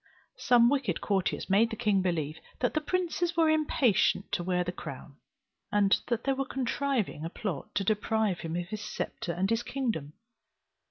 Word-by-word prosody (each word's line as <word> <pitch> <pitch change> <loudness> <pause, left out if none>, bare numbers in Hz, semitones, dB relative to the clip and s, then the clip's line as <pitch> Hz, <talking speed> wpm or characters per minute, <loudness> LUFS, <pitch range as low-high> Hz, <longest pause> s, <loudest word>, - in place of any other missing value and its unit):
Some 240 -1 +5
wicked 270 -1 +1
courtiers 195 -3 -1
made 210 +4 +4
the 225 - -4
king 210 -4 +2
believe 160 -4 -1 0.2
that 245 - +1
the 310 - +1
princes 345 0 -1
were 320 -1 +5
impatient 255 -11 +2
to 175 - -1
wear 180 0 +1
the 180 - -3
crown, - - -9 0.5
and 205 -1 +4
that 235 -2 -1
they 275 - +2
were 270 0 -1
contriving 265 - -1
a 165 - -3
plot 180 -5 -5
to 200 - +1
deprive 215 -1 +1
him 165 0 -4
of 175 0 -3
his 215 0 -5
sceptre 190 -4 -4
and 180 +3 0
his 230 0 +2
kingdom. 230 - -3
215 Hz, 175 wpm, -29 LUFS, 180-265 Hz, 0.5 s, Some